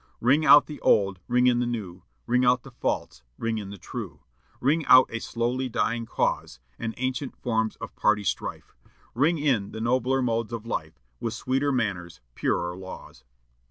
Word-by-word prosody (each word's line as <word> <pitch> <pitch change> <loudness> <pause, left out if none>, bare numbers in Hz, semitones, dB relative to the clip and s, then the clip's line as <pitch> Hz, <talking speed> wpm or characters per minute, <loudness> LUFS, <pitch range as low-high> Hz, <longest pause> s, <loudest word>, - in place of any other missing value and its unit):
"'Ring 135 +6 +3
out 145 0 +8
the 150 - -9
old, 100 -3 +3
ring 125 +1 +3
in 125 -1 +4
the 120 - 0
new! 100 -7 -5 0.2
Ring 125 +1 +2
out 125 0 +3
the 135 - -12
false, - - -3 0.2
ring 115 -1 -1
in 100 -2 -7
the 100 - -8
true! - - -7 0.4
Ring 150 +5 +2
out 130 +2 +8
a 115 - -3
slowly 120 +3 -2
dying 115 0 -1
cause, - - -1 0.2
And 115 0 -4
ancient 130 +1 -3
forms 110 -2 -1
of - - -9
party 105 -1 +2
strife! - - -4 0.4
Ring 150 +8 +2
in 130 -10 0
the 110 - -5
nobler 130 +3 +1
modes 115 -1 -1
of 115 -1 -5
life, 80 - -4 0.2
With - - -3
sweeter 135 +3 0
manners, 90 -9 -2
purer 85 +7 -1
laws.'" 95 0 -10
120 Hz, 175 wpm, -26 LUFS, 105-130 Hz, 0.4 s, out